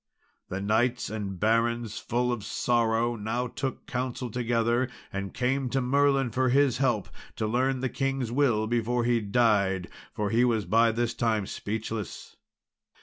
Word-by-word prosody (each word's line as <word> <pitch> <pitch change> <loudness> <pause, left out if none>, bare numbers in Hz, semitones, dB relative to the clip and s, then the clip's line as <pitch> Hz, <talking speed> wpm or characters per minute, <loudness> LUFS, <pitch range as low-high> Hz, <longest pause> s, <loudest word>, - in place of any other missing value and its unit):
The 95 +1 -3
knights 110 +3 +1
and 100 -4 -4
barons, 115 +1 +1
full 125 +1 0
of 120 -4 -3
sorrow, 120 +1 +1
now 115 +3 -2
took 130 +2 -4
counsel 125 -1 -3
together, 120 +1 +1 0.2
and 100 0 -3
came 130 +1 0
to 135 - 0
Merlin 135 0 +2
for 130 +2 +1
his 135 -1 +3
help 120 -7 +1 0.3
to 110 - -2
learn 130 +4 +1
the 130 - +1
king's 135 -2 -2
will 120 -5 +2
before 120 +1 0
he 120 -1 +2
died, 100 -4 +2 0.2
for 105 -1 -2
he 115 +2 +4
was 115 -5 +1
by 115 +5 +4
this 115 +1 -1
time 110 -3 0
speechless. 110 +1 -5
120 Hz, 150 wpm, -27 LUFS, 110-125 Hz, 0.3 s, he